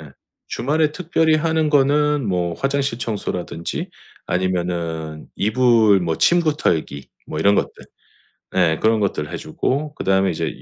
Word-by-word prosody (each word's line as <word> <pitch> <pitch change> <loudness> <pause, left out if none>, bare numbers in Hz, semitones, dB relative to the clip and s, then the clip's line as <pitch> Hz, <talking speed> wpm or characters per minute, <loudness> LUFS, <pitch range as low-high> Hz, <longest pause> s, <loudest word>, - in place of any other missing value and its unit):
네. 75 -3 -12 0.4
주말에 150 +3 0
특별히 160 -2 +1
하는 160 -1 +1
거는 145 -1 +2
뭐 90 -3 -1
화장실 135 -1 -1
청소라든지 90 -7 -4 0.4
아니면은 85 -4 -2
이불 110 -2 +4
뭐 85 -2 -1
침구 170 -4 +3
털기 70 - -1 0.2
뭐 75 - -5
이런 100 +5 +4
것들 - - 0 0.9
예 80 -4 +2
그런 110 0 +3
것들 85 -6 -2
해 85 - -4
주고 140 - -2
그다음에 95 0 +1
이제 80 - -4
105 Hz, 285 characters per minute, -20 LUFS, -, 0.9 s, 이불